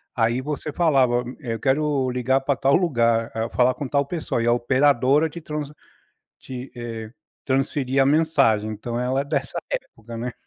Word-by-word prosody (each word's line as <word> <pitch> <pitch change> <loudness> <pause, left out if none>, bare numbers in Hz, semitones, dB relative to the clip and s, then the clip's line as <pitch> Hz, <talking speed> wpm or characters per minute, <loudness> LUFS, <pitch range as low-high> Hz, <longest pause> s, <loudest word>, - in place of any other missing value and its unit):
Aí, 120 +2 +1
você 150 +1 -4
falava: 135 -8 +3
"M 125 +1 -8
eu 115 -5 -4
quero 140 -1 +1
ligar 125 +2 +1
pra 140 0 0
tal 135 +2 +3
lugar. 115 -9 +2
Ah, 115 +1 -2
falar 125 +1 +3
com 140 - -4
tal 140 +1 +1
pessoa". 150 -7 -2
E 115 - 0
a - - +5
operadora 135 +4 +3
te 170 - -8
trans 150 -1 -5 0.7
te 130 0 -8
eh, 115 -2 -6 0.4
transferia 135 0 +1
a - - 0
mensagem. 140 -8 +3
Então, 115 +3 -4
ela 130 +2 0
é - - -3
dessa 140 -2 -2
época, 115 0 -6
né. 120 +1 -4
130 Hz, 180 wpm, -23 LUFS, 120-145 Hz, 0.7 s, a